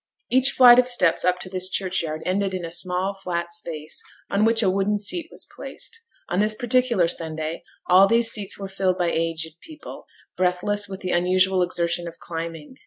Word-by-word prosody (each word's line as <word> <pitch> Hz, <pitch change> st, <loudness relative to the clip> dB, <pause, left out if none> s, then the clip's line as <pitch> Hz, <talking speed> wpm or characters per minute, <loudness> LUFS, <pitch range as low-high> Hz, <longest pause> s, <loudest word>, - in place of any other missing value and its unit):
Each 260 Hz, +1 st, +4 dB
flight 250 Hz, -2 st, +7 dB
of 250 Hz, -, +3 dB
steps 185 Hz, -9 st, +2 dB
up 180 Hz, 0 st, +2 dB
to -, -, -6 dB
this 185 Hz, 0 st, -1 dB
churchyard 180 Hz, -5 st, -2 dB
ended 190 Hz, +1 st, 0 dB
in 180 Hz, -2 st, -4 dB
a 165 Hz, -, -7 dB
small 180 Hz, +2 st, -2 dB
flat 175 Hz, -3 st, -4 dB
space, 160 Hz, -3 st, -3 dB, 0.3 s
on 205 Hz, +2 st, +2 dB
which 225 Hz, 0 st, +3 dB
a 195 Hz, -, +3 dB
wooden 200 Hz, +2 st, 0 dB
seat 315 Hz, -, -2 dB
was -, -, -8 dB
placed. 460 Hz, -, -7 dB, 0.3 s
On 180 Hz, -, -1 dB
this 215 Hz, +1 st, +2 dB
particular 240 Hz, -6 st, +2 dB
Sunday, 160 Hz, -1 st, -3 dB, 0.2 s
all 185 Hz, +2 st, +6 dB
these 230 Hz, +1 st, +3 dB
seats 205 Hz, -2 st, -2 dB
were 195 Hz, -, -6 dB
filled 190 Hz, -1 st, -1 dB
by 175 Hz, -1 st, 0 dB
aged 165 Hz, -1 st, -3 dB
people, 310 Hz, -2 st, -11 dB, 0.3 s
breathless 190 Hz, +3 st, 0 dB
with 190 Hz, 0 st, -7 dB
the 185 Hz, -, -3 dB
unusual 185 Hz, +1 st, +2 dB
exertion 175 Hz, -1 st, -1 dB
of 165 Hz, -, -9 dB
climbing. 165 Hz, -, -7 dB
185 Hz, 185 wpm, -23 LUFS, 170-205 Hz, 0.3 s, flight